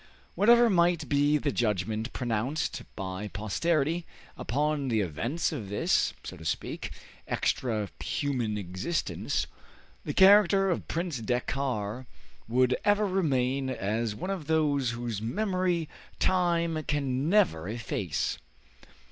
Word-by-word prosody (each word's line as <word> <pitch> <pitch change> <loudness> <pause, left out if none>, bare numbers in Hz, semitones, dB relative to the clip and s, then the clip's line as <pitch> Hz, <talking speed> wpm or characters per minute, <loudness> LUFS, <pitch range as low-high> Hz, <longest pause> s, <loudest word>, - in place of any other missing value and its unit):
Whatever 235 +3 +6
might 175 -5 +2
be 145 +2 +3
the 145 -1 -1
judgment 110 0 -1
pronounced 125 +5 -2
by 95 +1 -4
posterity 155 - 0 0.3
upon 145 +3 -1
the 115 -3 +1
events 110 - -1
of 115 -11 -5
this, 105 - +2
so - - -7
to 80 - -11
speak, 80 - -3 0.4
extra 110 -5 0 0.2
human 125 -7 -1
existence, 95 - -2 0.6
the - - -4
character 195 -1 +6
of 170 - -2
Prince 170 -5 -2
Dakkar 125 -1 -2 0.4
would 125 +2 +3
ever 205 +1 +3
remain 135 -8 +1
as 110 -1 -1
one 185 - -4
of 180 -7 -4
those 145 -5 +2
whose 115 -3 -3
memory 180 - 0 0.3
time 170 -3 +1
can 140 0 0
never 170 - +3
efface. 105 -7 -2
135 Hz, 115 wpm, -29 LUFS, 110-170 Hz, 0.6 s, Whatever